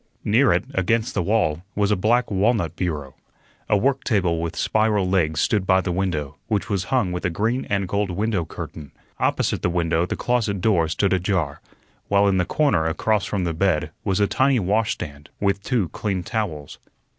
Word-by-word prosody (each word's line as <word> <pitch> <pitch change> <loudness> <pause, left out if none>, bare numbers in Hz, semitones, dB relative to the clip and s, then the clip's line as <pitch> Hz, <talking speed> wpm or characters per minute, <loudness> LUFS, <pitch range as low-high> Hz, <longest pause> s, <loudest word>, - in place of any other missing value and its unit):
Near 120 +5 +4
it, 90 +5 +1
against 110 +1 0
the 95 - 0
wall, 90 -5 +1
was 105 0 +1
a - - +4
black 115 +5 +1
walnut 100 -3 +1
bureau. 75 -7 -3 0.6
A 105 - +4
work 130 +6 +1
table 90 -7 +1
with 85 +1 -3
spiral 105 0 +1
legs 80 -5 +1
stood 100 -4 +1
by 95 0 +5
the 90 -1 -2
window, 85 -6 -2
which 105 0 -1
was 95 -3 0
hung 120 -7 +1
with 90 - -4
a 90 - +1
green 110 +9 -1
and 100 -2 0
gold 100 +1 -1
window 100 0 -1
curtain. 75 -2 -8 0.3
Opposite - - 0
the - - +1
window 85 0 +1
the - - -2
closet 115 -5 0
door 90 -4 +2
stood 95 +5 +1
ajar, 90 -6 -1 0.5
while 100 0 +3
in 95 -1 +2
the 90 - +2
corner 105 - +1
across 100 +5 0
from 100 -3 -2
the 85 -1 -1
bed 85 -2 0
was 95 -1 0
a 100 - +4
tiny 130 +4 +2
washstand 95 -8 -2
with 100 -1 0
two 110 -3 0
clean 95 -1 -3
towels. 85 - -4
95 Hz, 190 wpm, -23 LUFS, 85-105 Hz, 0.6 s, by